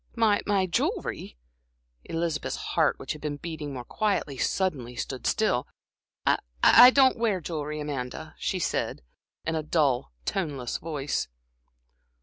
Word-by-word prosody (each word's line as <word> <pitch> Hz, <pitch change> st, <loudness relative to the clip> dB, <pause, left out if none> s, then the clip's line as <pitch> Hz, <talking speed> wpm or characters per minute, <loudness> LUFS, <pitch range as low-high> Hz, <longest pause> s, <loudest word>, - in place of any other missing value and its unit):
"My 220 Hz, -3 st, +3 dB
my 200 Hz, -2 st, +3 dB
jewelry?" 170 Hz, -, -2 dB, 0.7 s
Elizabeth's 165 Hz, -2 st, -2 dB, 0.2 s
heart, -, -, +3 dB
which -, -, -5 dB
had -, -, -6 dB
been 150 Hz, -1 st, -3 dB
beating 155 Hz, -2 st, -6 dB
more 130 Hz, -3 st, -6 dB
quietly, 200 Hz, -, -1 dB
suddenly 130 Hz, -5 st, -1 dB
stood 130 Hz, 0 st, -4 dB
still. 210 Hz, -, +1 dB, 0.6 s
"I -, -, +4 dB, 0.2 s
I 250 Hz, -, +10 dB
don't 260 Hz, -2 st, +4 dB
wear 220 Hz, -5 st, +1 dB
jewelry, 150 Hz, -2 st, -4 dB
Amanda," 140 Hz, -4 st, -5 dB
she -, -, -1 dB
said, -, -, -2 dB, 0.4 s
in 165 Hz, -, -1 dB
a 160 Hz, -, 0 dB
dull, 145 Hz, -, +1 dB
toneless 145 Hz, -10 st, -2 dB
voice. 150 Hz, -4 st, -2 dB
155 Hz, 135 wpm, -27 LUFS, 140-190 Hz, 0.7 s, I